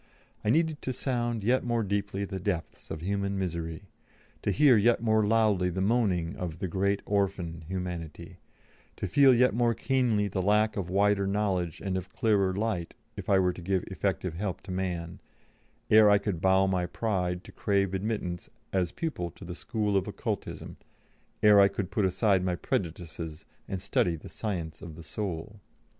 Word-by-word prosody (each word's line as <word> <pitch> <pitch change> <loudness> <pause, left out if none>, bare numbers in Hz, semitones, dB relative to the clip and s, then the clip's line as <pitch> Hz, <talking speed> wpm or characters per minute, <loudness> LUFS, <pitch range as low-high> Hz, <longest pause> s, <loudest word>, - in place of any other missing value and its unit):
I 105 - 0
needed 160 +3 +2
to 130 - -3
sound 120 -4 -1
yet 125 +5 +2
more 120 -2 0
deeply 100 0 -2
the 95 -1 -5
depths 85 -5 -4
of 80 - -5
human 100 +2 -1
misery, 85 -1 -3 0.6
to - - -1
hear 145 -4 +5
yet 115 +2 +3
more 110 -2 +3
loudly 105 -5 +3
the 90 +1 -3
moaning 95 -5 +1
of 85 -3 -4
"the 95 - -3
great 100 +3 0
Orphan," 95 -5 -1
Humanity, 90 -4 -5 0.6
to - - -4
feel 140 -2 +6
yet 125 -2 +4
more 120 0 +2
keenly 120 -6 +1
the 95 -1 -2
lack 105 +2 +3
of 95 -4 -3
wider 100 +1 +2
knowledge 95 -5 -1
and 95 -2 -1
of 95 0 -5
clearer 100 -4 +2
light 95 -4 -2 0.2
if - - -7
I 100 - +5
were 90 -1 +2
to 90 - -10
give 95 +1 0
effective 95 -1 -1
help 95 +2 -3
to 95 - -8
man, 90 -2 -3 0.7
ere 110 -1 +8
I 100 - +6
could 100 -4 -3
bow 95 0 +4
my 90 -2 0
pride 90 -3 -1
to - - -12
crave 100 -2 0
admittance 95 -3 -3 0.2
as 90 -3 +1
pupil 145 - -3
to 90 +3 -13
the 90 - -6
School 105 +2 -2
of 95 - +1
Occultism, - - -5 0.7
ere 105 -1 +8
I 100 - +8
could 100 -1 -4
put 100 +1 +1
aside 95 0 +2
my 90 -1 0
prejudices 80 -3 -4 0.2
and 95 - -3
study 90 -2 +1
the 80 - -10
Science 85 -7 -4
of 80 -2 -8
the 85 - -10
Soul. 100 +1 -5
95 Hz, 180 wpm, -29 LUFS, 90-105 Hz, 0.7 s, ere